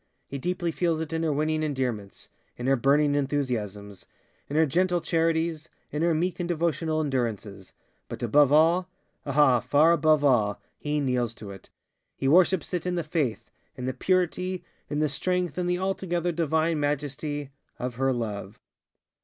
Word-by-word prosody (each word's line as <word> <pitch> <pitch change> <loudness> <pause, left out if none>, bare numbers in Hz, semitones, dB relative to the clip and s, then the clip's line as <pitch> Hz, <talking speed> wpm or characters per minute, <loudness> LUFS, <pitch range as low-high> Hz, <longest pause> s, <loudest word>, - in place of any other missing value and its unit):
He 140 - -6
deeply 175 +2 -1
feels 165 -1 0
it 160 -1 -4
in 160 - -1
her 160 -2 +1
winning 155 +2 0
endearmentsŌĆöin 125 -5 -5
her 135 +1 +4
burning 145 +3 +3
enthusiasmsŌĆöin 120 -9 -2 0.4
her 155 +3 +3
gentle 175 +4 +1
charitiesŌĆöin 165 -1 0 0.3
her 170 -1 +2
meek 180 +4 -1
and 175 0 -3
devotional 160 -1 0
endurancesŌĆöbut 115 -8 -5
above 140 +4 +5 0.8
allŌĆöah, 135 -4 +4
far 145 +6 +4
above 155 -3 +3
all, 110 -7 +3 0.2
he 150 0 -1
kneels 125 -4 0
to 100 -2 -9 0.7
itŌĆöhe 135 - +1
worships 185 +3 +3
it 180 0 -2
in 180 - 0
the 170 - -1
faith, 135 - -2 0.2
in 125 - -6
the 130 - -1
purity, 185 +4 0 0.3
in 145 - -2
the 155 0 +2
strength, 180 +4 -1
in 180 - -1
the 180 0 +1
altogether 180 -2 -1
divine 160 0 +1
majestyŌĆöof 145 0 -2 0.4
her 135 +3 +1
love. 105 -4 -4
150 Hz, 145 wpm, -26 LUFS, 130-170 Hz, 0.8 s, above